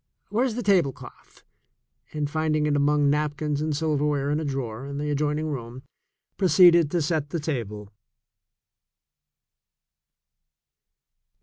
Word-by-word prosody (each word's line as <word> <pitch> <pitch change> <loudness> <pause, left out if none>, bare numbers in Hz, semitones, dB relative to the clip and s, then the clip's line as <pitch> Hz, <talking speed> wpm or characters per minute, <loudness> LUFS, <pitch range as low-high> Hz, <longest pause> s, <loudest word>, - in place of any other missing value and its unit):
Where's 230 +3 0
the 245 - -3
tablecloth?" 180 - -1 0.7
and 150 -2 -2
find 155 +1 -1
ing 150 -1 +1
it 150 -1 +1
among 145 0 +2
napkins 150 0 -1
and 155 -2 -1
silverware 145 -2 0
in 150 - 0
a - - -3
drawer 135 -3 -4
in 140 0 -6
the 150 +1 -2
adjoining 150 +1 -1
room, 125 -1 -7 0.5
proceeded 170 -3 +5
to 170 +1 0
set 150 -2 -1
the 170 - -3
table. 105 -9 -5
150 Hz, 120 wpm, -25 LUFS, 140-155 Hz, 0.7 s, proceeded